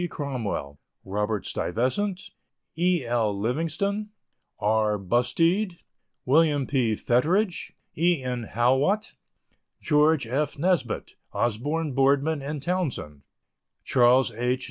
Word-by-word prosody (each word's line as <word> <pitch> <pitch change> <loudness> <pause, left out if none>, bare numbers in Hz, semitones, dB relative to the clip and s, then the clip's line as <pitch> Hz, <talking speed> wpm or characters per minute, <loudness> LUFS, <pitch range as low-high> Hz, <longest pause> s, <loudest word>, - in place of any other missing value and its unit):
Cromwell, 115 - -4 0.3
Robert 105 +1 -2
Stuyvesant, 185 - -2 0.4
E. 175 -3 +1
L. 115 -4 0
Livingston, 165 - -1 0.5
R. 105 0 +1
Busteed, 165 - +1 0.5
Wm. 145 0 +3
P. 125 -6 +1
Fettridge, 170 - 0 0.2
E. 170 -3 +2
N. 125 -3 -4
Haughwout, 135 - +1 0.7
Geo. 150 0 +4
F. 140 +1 -2
Nesbitt, 160 -7 0 0.2
Osborne, 145 +7 -1
Boardman 140 +3 +2 0.2
& - - -12
Townsend, 140 - -3 0.6
Charles 125 0 +4
H. 125 +3 -1
135 Hz, 95 wpm, -26 LUFS, 120-165 Hz, 0.7 s, Geo